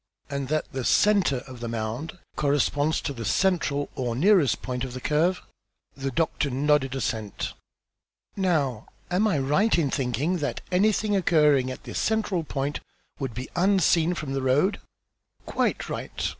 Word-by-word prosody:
"And 140 -1 -2
that 155 +2 0
the 130 -1 -3
centre 185 - +3
of 130 -2 -10
the 120 - -4
mound 115 +9 -4 0.2
corresponds 145 +1 +1
to 140 - -3
the 115 -3 -6
central 145 - +1
or 120 -3 -2
nearest 170 - +3
point 125 0 -3
of 130 -2 -5
the - - -4
curve?" 165 +7 +1 0.5
The 135 0 -3
doctor 155 0 0
nodded 135 0 +1
assent. 110 -6 -3 0.8
"Now 150 - 0 0.2
am 195 +5 +3
I 195 - +1
right 150 +12 +2
in 145 -5 +1
thinking 140 +6 0
that 145 -3 -3
anything 205 +2 +2
occurring 150 -8 +3
at 130 - -7
this - - -4
central 210 -6 0
point 140 -1 -3 0.4
would 135 -5 -4
be 125 +2 -6
unseen 180 -2 +3
from 145 -5 -4
the 135 - -1
road?" 145 +11 +2 0.7
"Quite - - -1
right. - - -3
145 Hz, 155 wpm, -26 LUFS, 130-180 Hz, 0.8 s, centre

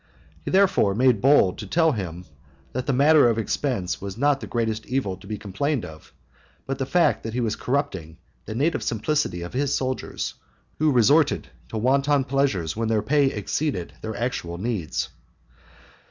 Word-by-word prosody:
He - - -4
therefore 190 - +3
made 125 -3 +3
bold 135 -9 +4
to - - -6
tell 165 -1 +3
him 90 - -5 0.5
that 125 0 -4
the - - +2
matter 140 0 +5
of 115 - 0
expense 115 -4 -2
was 100 +1 -6
not 140 +2 +2
the - - -7
greatest 110 -2 -2
evil 125 -7 -1
to - - -15
be 105 0 -4
complained 110 +7 -2
of, 80 -1 -12 0.5
but 135 0 -4
the 135 - -2
fact 150 -8 +2
that 115 0 -6
he - - 0
was 110 -3 0
corrupting 95 - -2 0.3
the 110 - -6
native 150 +7 +1
simplicity 110 - -1
of 85 - -8
his 140 +2 0
soldiers, 130 -1 -3 0.5
who 155 0 +3
resorted 140 +5 +3 0.2
to 110 - -4
wanton 135 +4 +2
pleasures 130 - 0
when 115 +1 -1
their 110 -2 +1
pay 145 +4 +3
exceeded 130 - -2
their 110 -1 -5
actual 105 -8 -3
needs. 100 -5 -2
125 Hz, 170 wpm, -24 LUFS, 105-140 Hz, 0.5 s, matter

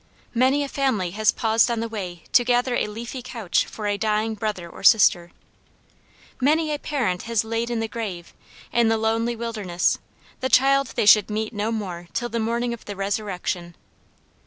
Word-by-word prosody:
Many 260 +4 +3
a - - -3
family 260 -11 0
has 215 +3 +2
paused 225 0 +2
on 235 -1 -1
the 230 - -2
way 185 -6 -6
to 245 - +5
gather 245 +1 +1
a - - 0
leafy 235 +4 -6
couch 230 -7 -1
for 215 - -7
a 205 -1 0
dying 215 0 0
brother 210 -5 -4
or - - -12
sister. 180 -5 +5 1.1
Many 305 +3 +2
a 295 - -3
parent 240 -14 -1
has 230 -2 +2
laid 230 +1 -2
in 235 -2 -1
the 225 - -1
grave, 200 -7 -6 0.4
in 235 -1 +4
the 225 0 +2
lonely 225 +2 0
wilderness, 215 -7 -1 0.4
the 260 - -1
child 275 +1 +4
they - - +1
should 210 0 +6
meet 215 +2 -3
no 210 +1 -1
more 180 -6 -5
till 240 -1 -2
the 235 - -2
morning 235 +2 -1
of 235 - -10
the 205 - -6
resurrection. 190 -4 -3
225 Hz, 180 wpm, -23 LUFS, 205-240 Hz, 1.1 s, should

